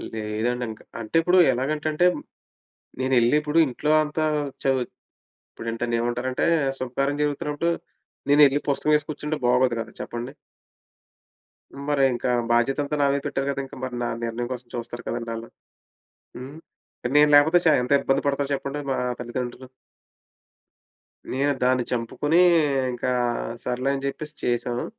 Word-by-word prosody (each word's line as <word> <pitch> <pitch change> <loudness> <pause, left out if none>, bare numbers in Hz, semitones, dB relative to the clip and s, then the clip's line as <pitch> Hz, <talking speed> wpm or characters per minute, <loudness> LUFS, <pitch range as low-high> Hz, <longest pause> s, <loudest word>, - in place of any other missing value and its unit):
లేదండి 110 +3 -2
ఇంకా. 110 - -12 0.2
అంటే 110 +7 -8
ఇప్పుడు 180 +2 +3 0.2
ఎలాగంటంటే, 155 +6 0 0.9
నేనెళ్ళి 130 0 +3
ఇప్పుడు 150 +2 +1
ఇంట్లో 145 +4 -1
అంతా 155 +1 -1 0.4
చవ్ 135 -1 +2 0.6
ఇప్పుడు 115 0 -7
దాన్నేమంటారంటే, 120 +3 -1 0.3
శుభకార్యం 140 +3 -1
జరుగుతున్నప్పుడు 150 +2 -1 0.6
నేనెళ్ళి 145 -1 +6
పుస్తకం 145 +2 +1
యేసి 150 0 -4
కూర్చుంటే 150 +1 -3
బాగోదు 125 -1 +3
గదా! 115 0 -7
చెప్పండి. 120 +2 -5 1.6
మరింకా 135 -4 +2 0.2
బాధ్యత 120 +4 +2
అంతా 145 +1 -3
నామీద 140 0 +2
పెట్టారు 135 0 -2
కదా! 140 0 -2
ఇంకా 135 - -12
మరి 130 -1 -4
నా - - 0 0.2
నిర్ణయం 115 +1 -3
కోసం 125 -1 -9
చూస్తారు 120 0 -6
కదండీ 115 -1 -3
ఆళ్ళు. 115 +1 -8 0.9
హ్మ్. 135 +4 -9 0.6
నేను 150 0 +6
లేకపోతే 155 +4 +6
చ - - +5
ఎంత 125 - -4
ఇబ్బంది 135 +1 +1
పడతారు 140 0 -1
చెప్పండి 140 +1 -3
మా - - +1 0.2
తల్లిదండ్రులు. 125 +1 -5 1.7
నేను 140 +2 +1
దాన్ని 125 -1 +3
చంపుకొని 125 +7 0 0.6
ఇంకా 120 +1 -2 0.5
సర్లే 125 +2 -1
అని 135 0 -4
చెప్పేసి 150 +2 -6
చేసాను. 120 0 -1
130 Hz, 125 wpm, -24 LUFS, 120-145 Hz, 1.7 s, నేనెళ్ళి